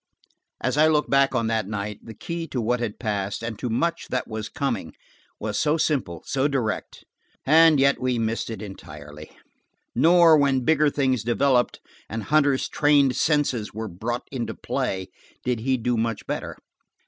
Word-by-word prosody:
As - - -1
I 155 +1 +6
look 150 -1 +1
back 135 -1 +3
on 115 -2 +1
that 110 -3 -1
night, 105 0 -4
the 115 - -10
key 170 +5 -5
to 130 - -3
what 120 +2 0
had 115 -3 -3
passed 100 -2 -3
and 115 -2 -5
to 125 - -3
much 170 +9 -1
that 125 - -2
was 110 -1 -5
coming 120 - -3 0.5
was 105 -1 -2
so 155 +1 +2
simple, 130 - -1
so 135 +1 +1
direct–and 145 +4 +1
yet 140 0 +3
we 125 -1 0
missed 115 0 -2
it 110 -1 -6
entirely. 75 -6 -10 0.6
Nor, 165 +3 +6
when 135 -3 +2
bigger 155 -1 +4
things 130 -5 0
developed, 125 +2 +1 0.3
and 110 -1 -4
Hunter's 145 -3 +2
trained 145 -3 +3
senses 140 -9 0
were 110 0 -4
brought 115 +7 -4
into 125 -4 -4
play, 95 -1 -3 0.4
did 125 -2 0
he 130 +3 0
do 120 +1 -1
much 115 -1 -2
better. - - -4
125 Hz, 165 wpm, -24 LUFS, 110-145 Hz, 0.6 s, I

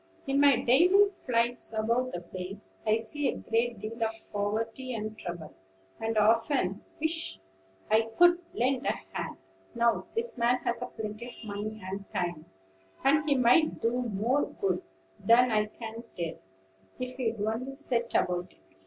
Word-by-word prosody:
"In 275 0 +1
my 285 -2 +7
daily 355 +12 +5
flights 240 - 0
about 235 +4 +1
the 175 - -4
place, 185 +3 -8 0.2
I 215 - +5
see 250 +6 0
a - - -1
great 230 +1 0
deal 220 +3 -7
of 220 - +2 0.2
poverty 225 +5 -2
and 215 0 -4
trouble, 175 -5 -7 0.5
and 225 0 -1
often 220 -2 +2 0.2
wish 320 - -2 0.5
I 225 +1 +4
could 350 0 +7
lend 255 +2 0
a - - +3 0.2
hand. - - -4 0.4
Now, 235 0 +2
this 455 - -2
man 240 +2 +4
has 240 0 -1
plenty 215 +2 -5
of 245 - -10
money 215 0 -5
and 195 +1 -6
time; 175 -4 -2 0.6
and 300 +3 +3
he 285 - +4
might 255 +6 +4
do 230 - +1
more 245 +2 +1
good 395 -2 +1 0.4
than 240 +2 +5
I 210 -1 +2
can 225 +1 -8
tell, 170 -2 -3 0.6
if 255 0 -5
he'd 230 -4 -1
only 225 +6 -2
set 240 -5 -2
about 180 0 0
it. 95 - -30
230 Hz, 155 wpm, -29 LUFS, 215-255 Hz, 0.6 s, my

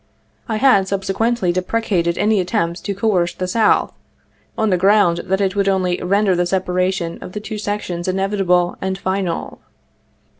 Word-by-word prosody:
I 220 - 0
had 215 -5 +4
subsequently 195 +1 0
deprecated 185 -2 -1
any 210 0 +2
attempt 170 -1 -1
to 200 - -2
coerce 190 -4 0
the 185 - -3
South, 220 +4 +2 0.6
on 220 -2 +1
the 180 - +3
ground 190 -2 +3
that 190 +1 0
it 195 0 0
would 200 -1 +1
only 185 -2 0
render 195 +1 +2
the 175 0 0
separation 185 -1 -1
of 180 - -9
the 210 - -4
two 215 0 -6
sections 205 -4 -4
inev 190 +1 -1
itable 180 -3 +1
and 190 0 -2
final. 190 -2 -3
190 Hz, 160 wpm, -19 LUFS, 180-205 Hz, 0.6 s, had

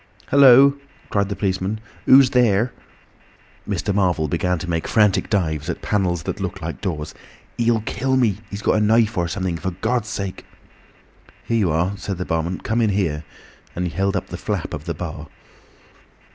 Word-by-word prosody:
"Hullo," 140 +1 +7 0.3
cried 100 -1 +1
the 100 - -3
policeman, 95 +1 -2 0.3
"who's 135 -1 +7
there?" 120 -1 +2 1.0
Mr. 100 - -1
Marvel 90 -5 +1
began 90 +4 0
to 85 - -6
make 80 -2 -2
frantic 105 -3 +2
dives 80 -6 -1
at 85 - -4
panels 90 -5 0
that - - -4
looked - - -4
like - - -6
doors. 80 -6 -4 0.5
"He'll 115 -1 +2
kill 130 +4 -1
me—he's 105 -3 -1
got - - +2
a - - +2
knife 110 +1 +3
or 85 -3 0
something. 90 -1 -3
For 95 - -2
Gawd's 110 +5 -2
sake—!" 100 -4 -5 1.0
"Here 115 - 0
you 95 -5 +2
are," 85 +5 0
said 100 -2 -4
the 90 - -4
barman. 80 +3 -2
"Come 115 +1 0
in 110 - +3
here." 85 -7 -1 0.5
And 90 - -2
he 90 - -3
held 95 +4 0
up 95 - -3
the - - -6
flap - - -3
of - - -6
the - - -3
bar. - - -6
100 Hz, 175 wpm, -21 LUFS, 90-110 Hz, 1.0 s, Hullo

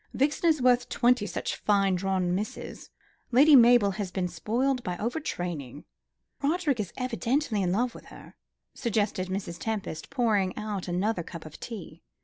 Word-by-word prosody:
Vixen 295 +5 +2
is 305 -5 +1
worth 245 -1 +3
twenty 245 -3 +2
such 180 - -3
fine 200 -2 +2
drawn 185 -1 0
misses. 205 +4 -5 0.4
Lady 285 +5 +7
Mabel 240 -4 +6
has 195 -1 -4
been 185 0 -2
spoiled 240 +10 -1
by 180 -1 -3
over 240 +8 -2
training." 160 - -5 0.6
"Roderick 295 -3 +1
is 200 -4 -3
evidently 250 -2 0
in 180 -2 0
love 235 +5 0
with - - -12
her," - - -13 0.4
suggested 210 -6 -1
Mrs. 185 -2 -4
Tempest, 210 -8 -4
pouring 220 -8 +1
out 210 -3 -4
another 185 +3 0
cup 165 -1 -9
of 155 - -11
tea. 190 -8 -8
210 Hz, 155 wpm, -28 LUFS, 185-250 Hz, 0.6 s, Lady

